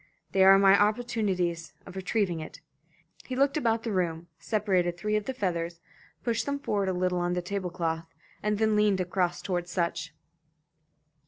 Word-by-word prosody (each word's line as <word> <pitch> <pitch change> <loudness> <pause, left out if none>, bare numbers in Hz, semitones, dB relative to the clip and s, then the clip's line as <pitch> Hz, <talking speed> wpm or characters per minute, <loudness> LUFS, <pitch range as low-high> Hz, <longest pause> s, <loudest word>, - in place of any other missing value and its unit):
They 190 - +4
are 195 0 +8
my 195 0 +6
opportunities 205 -7 0
of 185 - -11
retrieving 190 -2 0
it." 155 - -8 0.7
He 255 - -4
looked 275 +2 +2
about 230 -6 +1
the 230 - -2
room, 170 -3 -1
separated 185 -5 0
three 210 +4 -1
of 210 -1 0
the 265 - -3
feathers, 170 -6 -2 0.4
pushed 230 0 -1
them 280 0 0
forward 205 -8 -1
a - - +2
little 180 0 0
on 175 0 0
the 180 - -1
tablecloth, 175 -4 -3 0.3
and 210 0 0
then 220 0 +2
leaned 210 -2 +3
across 180 -1 -1
toward 175 -2 -2
Sutch. 170 -2 -2
190 Hz, 165 wpm, -28 LUFS, 175-210 Hz, 0.7 s, are